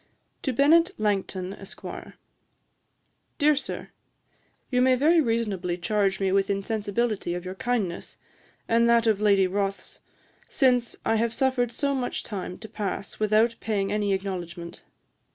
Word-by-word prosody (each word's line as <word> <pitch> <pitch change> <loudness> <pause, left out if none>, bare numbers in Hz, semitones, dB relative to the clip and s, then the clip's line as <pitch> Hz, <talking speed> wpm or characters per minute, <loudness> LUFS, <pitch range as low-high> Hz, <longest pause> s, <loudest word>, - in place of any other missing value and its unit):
To 270 - -1
BENNET 330 - +4
LANGTON, 195 -3 -1
ESQ. 195 -1 -11 1.5
'Dear 300 +1 +4
Sir, 285 - -4 0.8
You 250 -1 +3
may 255 0 +5
very 320 +6 +4
reasonably 210 - -1
charge 195 +1 0
me 195 -1 +1
with 195 0 +2
insensibility 205 -1 -1
of 180 0 -6
your 185 - -4
kindness, 200 -4 -3 0.5
and 235 +1 +3
that 235 0 +4
of 215 -2 +2
Lady 200 -2 +4
Rothes, 195 +1 -3 0.5
since 250 -4 +2
I 225 - +2
have 230 +1 0
suffered 260 -3 +1
so 280 +2 0
much 255 -2 -2
time 190 -3 -5
to 220 - -9
pass 200 -2 -5
without 215 +2 +3
paying 200 -3 -1
any 205 -1 0
acknowledgement. 175 -3 -4
215 Hz, 135 wpm, -26 LUFS, 195-240 Hz, 1.5 s, may